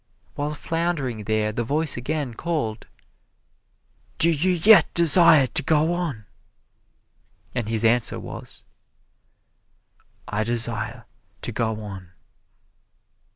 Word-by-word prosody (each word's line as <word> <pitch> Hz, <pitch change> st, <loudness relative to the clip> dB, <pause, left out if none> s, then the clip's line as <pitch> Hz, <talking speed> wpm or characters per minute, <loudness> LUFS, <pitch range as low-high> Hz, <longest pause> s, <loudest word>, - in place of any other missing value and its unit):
While 150 Hz, +1 st, -4 dB
floundering 145 Hz, -10 st, -3 dB
there 110 Hz, 0 st, 0 dB
the 120 Hz, -, -2 dB
voice 150 Hz, +5 st, +1 dB
again 135 Hz, 0 st, -4 dB
called, 115 Hz, -8 st, -4 dB, 1.3 s
"Do 170 Hz, -, +4 dB
you 165 Hz, +4 st, 0 dB
yet 185 Hz, +5 st, +5 dB
desire 170 Hz, -3 st, +5 dB
to 130 Hz, -, +5 dB
go 155 Hz, +3 st, +1 dB
on?" 160 Hz, -, -4 dB, 1.3 s
And 120 Hz, -4 st, -3 dB
his 115 Hz, 0 st, +2 dB
answer 115 Hz, +1 st, +2 dB
was, -, -, -10 dB, 1.6 s
"I 105 Hz, +1 st, -2 dB
desire 115 Hz, 0 st, -3 dB, 0.4 s
to -, -, -2 dB
go 110 Hz, -1 st, -2 dB
on." 95 Hz, -4 st, -10 dB
125 Hz, 105 wpm, -23 LUFS, 110-160 Hz, 1.6 s, yet